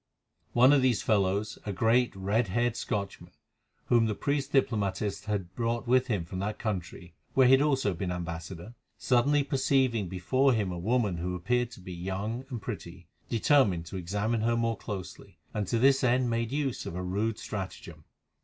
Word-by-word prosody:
One 130 +4 +6
of 140 - +5
these 125 -5 +2
fellows, 100 0 +1
a 105 - -3
great, 115 +5 +2
red 100 +4 0
haired 120 +4 0
Scotchman, 100 -4 -4 0.5
whom 115 -2 +3
the 105 - -1
priest 140 +2 -1
diplomatist 105 -6 0
had 100 -4 -3
brought 115 +1 -1
with 130 +1 +3
him 100 -9 -1
from 95 +2 -6
that 105 +2 -3
country, 90 -5 -5 0.2
where 130 - +6
he 125 - +6
had 135 +1 +6
also 135 -9 +2
been 90 +1 -3
ambassador, 85 +3 -6 0.2
suddenly 140 +4 +3
perceiving 130 -7 +1
before 130 +9 +2
him 105 -5 0
a 90 - -5
woman 105 -1 +1
who 90 +2 -3
appeared 120 +7 0
to - - -12
be 90 0 -8
young 100 +8 -4
and 120 -4 -6
pretty, - - -7 0.2
determined 115 - +3
to 95 - -6
examine 105 +6 -1
her 115 +1 +1
more 115 -1 0
closely, 100 -5 -8 0.2
and 105 -2 -2
to 115 - 0
this 135 +3 +4
end 125 -1 +2
made 115 0 -1
use 140 -3 -2
of - - -6
a 90 - -3
rude 105 +5 -1
stratagem. 95 -3 -7
110 Hz, 180 wpm, -29 LUFS, 95-125 Hz, 0.5 s, One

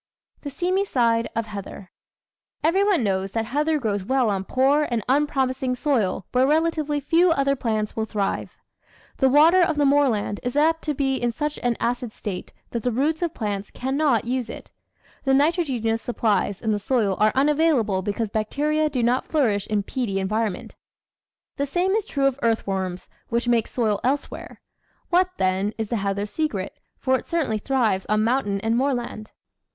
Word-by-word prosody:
The 285 - -5
Seamy 360 +7 0
Side 230 -9 +1
of 230 0 -1
Heather 200 -2 -8 0.7
Everyone 380 - +3
knows 195 -1 0
that 225 -1 -1
heather 300 +6 0
grows 205 -7 -2
well 250 0 +1
on 195 -1 -2
poor 275 +6 +2
and 235 -3 -1
un 285 +4 +3
promising 260 -2 -1
soil 240 - 0
where 255 +1 +3
relatively 310 -1 +1
few 335 +5 +3
other 275 -3 +2
plants 215 -4 -2
will 220 - -1
thrive. 205 -2 -3 0.6
The 265 - +3
water 320 +7 +6
of 325 -3 +2
the 290 - +3
moorland 270 -8 +2
is 245 +1 -3
apt 325 +2 +3
to 300 -2 -1
be 270 -1 0
in 240 -1 0
such 295 +4 -3
an 245 -2 0
acid 240 -1 -2
state 190 -4 -6 0.2
that 235 - -2
the 245 - 0
roots 295 +7 0
of 340 -2 -2
plants 205 -2 -3
cannot 265 -3 0
use 245 -1 -2
it. - - -9 0.5
The 270 -1 +3
nitrogenous 270 -7 +1
supplies 210 -4 0
in 220 - +1
the 210 - 0
soil 205 -3 +1
are 215 0 +4
unavailable 275 -8 +2
because 205 +3 -2
bacteria 300 +8 0
do 255 -4 -1
not 245 +2 +1
flourish 220 -10 +1
in 210 -2 0
peaty 220 -4 -2
environ 210 +2 0
ment. - - -11 0.8
The 280 0 -1
same 355 +6 0
is 430 +1 0
true 275 -2 0
of 275 0 +1
earthworms, 190 -5 -1 0.2
which 235 +1 -1
make 235 -2 +2
soil 215 -5 0
elsewhere. 275 +3 -3 0.5
What, 365 +1 +4
then, 190 +3 0
is 220 -2 -3
the 235 - 0
heather's 200 +1 -2
secret, 225 -13 -3 0.2
for 260 -1 +1
it - - -14
certainly 305 -11 0
thrives 220 -6 0
on 215 0 +2
mountain 225 -4 0
and 225 +2 +1
moorland? 240 -4 -2
245 Hz, 175 wpm, -23 LUFS, 215-290 Hz, 0.8 s, water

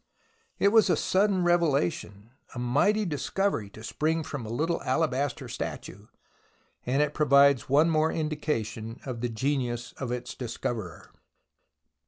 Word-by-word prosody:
It 200 - +4
was 220 0 +5
a - - +4
sudden 190 -1 +2
revelation, 135 - 0 0.2
a - - -6
mighty 145 - +2
discovery 160 - -1
to 110 +2 -13
spring 160 +7 -1
from 140 -6 -6
a - - -7
little 160 +8 -1
alabaster 135 0 -1
statue, 100 +4 -6 0.8
and 135 +4 +3
it 150 0 -2
provides 140 -4 +4
one 150 +5 +4
more 155 0 +2
indication 120 -8 -3
of 125 -4 -5
the 120 - -1
genius 120 0 -2
of 130 -3 -3
its 125 0 -4
discoverer. 115 -6 -5
140 Hz, 135 wpm, -27 LUFS, 120-160 Hz, 0.8 s, was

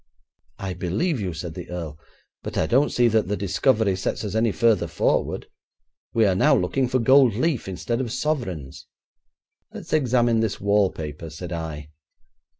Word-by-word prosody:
'I 95 -1 -4
believe 115 - 0
you,' 95 -2 -2
said 80 0 -6
the 90 +1 -8
earl; 80 -4 -6 0.4
'but - - -6
I - - +2
don't 135 +5 +3
see 120 -1 +3
that 110 -4 +1
the 105 +1 -1
discovery 100 +1 +1
sets 95 - -3
us 105 -2 -4
any 110 0 +2
further 115 -2 +2
forward. - - 0 0.7
We're 110 -4 +3
now 90 - +4
looking 125 +9 0
for 125 - +1
gold 130 -1 +5
leaf 140 -1 0
instead 115 +6 -2
of 120 -4 -4
sovereigns.' 120 - -3 0.8
'Let's - - -8
examine 120 -5 +3
this 110 -2 -1
wallpaper,' 90 -7 0
said 85 +3 -8
I. 75 -3 -6
105 Hz, 155 wpm, -24 LUFS, 90-120 Hz, 0.8 s, gold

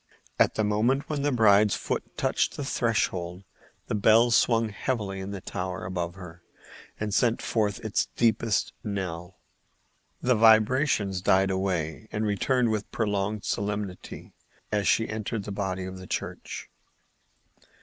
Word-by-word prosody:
At - - +4
the 110 - +1
moment 110 +7 +1
when 145 -2 -1
the 145 +1 +1
bride's 105 -4 +5
foot - - -4
touched - - 0
the 145 - -3
threshold 95 -8 -1 0.4
the - - -4
bell 110 +3 +5
swung 115 -1 +3
heavily 105 -2 -3
in 95 +1 -5
the 100 -2 -6
tower 90 -1 -4
above 90 -1 -3
her 85 -3 -11 0.6
and 105 -1 -2
sent 115 +3 +2
forth 105 -3 -1
its 110 - 0
deepest 110 -2 +1
knell. 95 -4 -4 0.8
The 125 - +2
vibrations 110 -2 +4
died 95 +1 +3
away, 95 -1 -2
and 105 +1 -1
returned 115 +4 +1
with 105 -1 -2
prolonged 105 -1 -1
solemnity 100 -2 -4 0.4
as 105 -1 0
she 115 - +3
entered 110 0 -3
the 105 - -6
body 95 -2 -3
of 95 0 -7
the 95 - -10
church. - - -5
105 Hz, 140 wpm, -27 LUFS, 95-115 Hz, 0.8 s, bride's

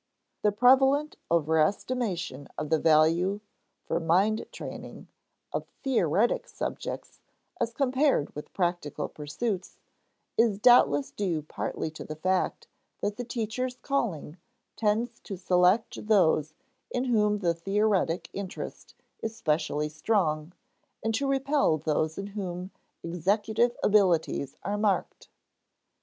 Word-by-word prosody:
The 210 - +3
prevalent 265 +6 +4
overestimation 170 - 0
of 150 - -4
the 160 - +4
value, 165 +6 +3 0.5
for - - 0
mind 190 +7 +2
training, - - -8 0.4
of - - -3 0.2
theoretic 225 - +2
subjects - - -5 0.4
as 235 -1 0
compared 265 - +1
with 150 - -8
practical 175 -5 -1
pursuits, 180 +6 -4 0.6
is 225 -3 +3
doubtless 205 - +5
due 175 -7 -2
partly 155 +1 -4
to 160 - -8
the 155 - -7
fact 185 +4 -1 0.3
that 205 0 -2
the 245 - -3
teacher's 245 +2 -3
calling 190 - -2 0.4
tends 225 +2 0
to 195 - -7
select 180 +4 +2
those 160 -7 +3 0.3
in 245 - -1
whom 210 -4 +2
the 175 -4 +1
theoretic 195 -1 0
interest 195 -2 -7 0.3
is 225 0 -4
specially 150 -4 0
strong 155 -1 0 0.5
and 225 +1 0
to 275 +5 0
repel 275 - +2
those 155 +1 -1
in 195 - -4
whom 185 -2 -5 0.3
executive 210 +8 +1
abilities 175 -9 +2
are 205 +1 -2
marked. 205 -2 -1
195 Hz, 115 wpm, -28 LUFS, 160-225 Hz, 0.6 s, doubtless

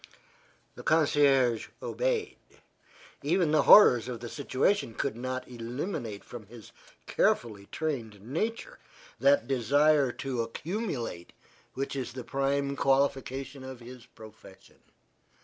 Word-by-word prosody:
The - - -10
concierge 140 -6 +3
obeyed. - - -2 0.8
Even 165 +2 +1
the 155 -1 +4
horrors 125 - +8
of 125 -2 -5
the 120 - -7
situation 140 - 0
could 140 -5 -2
not 130 +1 -4
eliminate 120 - -5
from 115 -4 -10
his 115 0 -13 0.3
carefully 105 -4 0
trained 120 -10 -4
nature 220 - -4 0.4
that 280 0 +3
desire 140 +2 +3
to 130 -3 -3
accumulate 125 - -4 0.4
which 135 +1 -3
is 125 -3 -4
the 130 -1 -6
prime 140 +2 -1
qualification 135 0 0
of 130 -2 -8
his 120 0 -12
profession. 110 -3 -16
135 Hz, 115 wpm, -29 LUFS, 120-150 Hz, 0.8 s, horrors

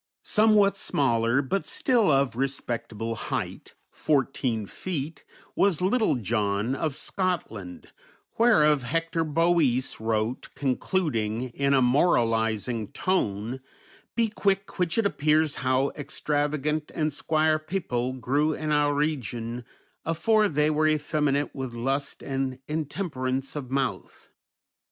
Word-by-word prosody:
Somewhat 210 -2 +4
smaller, 120 -6 +1
but 195 +9 -1
still 235 -7 +2
of 135 -3 +2
respectable 115 -4 -3
height, 115 - -5 0.2
fourteen 135 -6 0
feet, 155 - -5 0.3
was 195 -5 +3
"Littell 210 - +2
Johne" 105 +1 0
of 145 0 -2
Scotland, 130 - -3 0.5
whereof 150 - +5
Hector 165 +5 -1
Boece 155 -5 +1
wrote, 110 +2 -1
concluding, 130 - -1
in 140 +3 +1
a 130 - +4
moralizing 115 - +2
tone, 120 - -1 0.6
"Be 230 -2 +2
quilk 195 -2 -1
(which) 175 +1 +1
it 225 - +2
appears 155 -4 +2
how 130 +1 +1
extravegant 150 +1 -2
and 155 -2 0
squaire 155 +1 +1
pepill 140 -7 -2
grew 145 +6 +1
in 155 0 -3
oure 145 -1 +2
regioun 125 -5 -2 0.4
afore 210 +6 +2
they 150 0 +2
were 155 +1 +2
effeminat 150 -2 +1
with 130 -3 -5
lust 135 +4 -2
and 135 -1 -2
intemperance 145 -4 -3
of 140 -4 -5
mouth." 135 +1 -3
145 Hz, 115 wpm, -26 LUFS, 125-160 Hz, 0.6 s, whereof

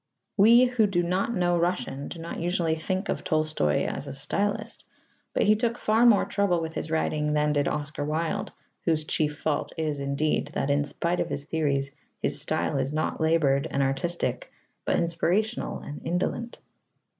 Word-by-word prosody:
We 230 +5 +7
who 245 -4 +2
do 175 -3 +1
not 185 +7 0
know 175 -1 +2
Russian 170 -5 -1
do - - -7
not 165 +1 -6
usually 170 -1 0
think 185 +5 -2
of - - -2
Tolstoy 155 - +1
as - - -4
a - - -5
stylist, 200 +9 -2 0.5
but - - +1
he 215 +1 +5
took 235 +2 -1
far 225 +3 +4
more 220 -4 +5
trouble 200 -4 +1
with 160 -1 -4
his 160 - -4
writing 150 -1 0
than 150 0 +2
did 145 -1 +1
Oscar 150 0 -3
Wilde 165 +7 -2 0.3
(whose 160 -2 +1
chief 150 -1 0
fault 155 0 -2
is, 155 -3 -1
indeed, 140 +2 0
that 140 - 0
in 145 0 +2
spite 170 +4 -1
of - - -1
his 140 - -3
theories 140 -4 0 0.3
his - - +1
style 140 - -1
is 135 +1 -1
not 155 +1 -2
laboured 160 -3 +3
and 140 - +1
artistic 135 +6 -2 0.3
but - - +2
inspirational 180 +7 0
and 145 - -8
indolent). 185 +7 -2
160 Hz, 175 wpm, -27 LUFS, 150-190 Hz, 0.5 s, We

